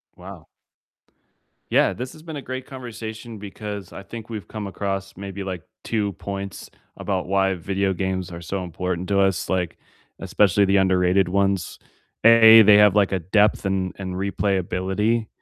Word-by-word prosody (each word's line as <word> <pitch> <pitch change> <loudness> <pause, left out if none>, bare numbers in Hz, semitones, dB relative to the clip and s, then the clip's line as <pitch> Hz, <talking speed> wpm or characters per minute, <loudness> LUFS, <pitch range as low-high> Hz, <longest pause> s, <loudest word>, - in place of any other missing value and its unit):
Wow. 90 -3 -12 1.2
Yeah, - - +3
this 125 +1 -6
has 155 - -15
been 160 -2 -7
a 140 - -5
great 130 0 -6
conversation 115 -3 -8
because 100 -1 -7
I - - -8
think 110 +3 -9
we've 105 -5 -6
come 105 -2 -6
across 95 0 -4
maybe 100 0 -7
like 90 -3 -5 0.2
2 105 -3 -1
points 100 +1 -7 0.3
about 95 -3 -2
why 95 0 +2
video 95 +2 -1
games 95 -1 -3
are 85 0 -8
so 95 +3 -4
important 90 +1 -4
to 100 -1 +2
us, 95 -2 +1
like, 90 -3 -1 0.4
especially 100 0 +2
the 100 +1 +3
underrated 95 -1 +3
ones. 100 -2 0 0.5
A, 115 -1 +9
they 105 0 +7
have 105 -1 +6
like 100 -2 +3
a 95 - 0
depth 105 +4 +2
and 95 -1 -1
and 95 -1 -5
replayability, 100 +3 -1
100 Hz, 160 wpm, -23 LUFS, 95-105 Hz, 1.2 s, A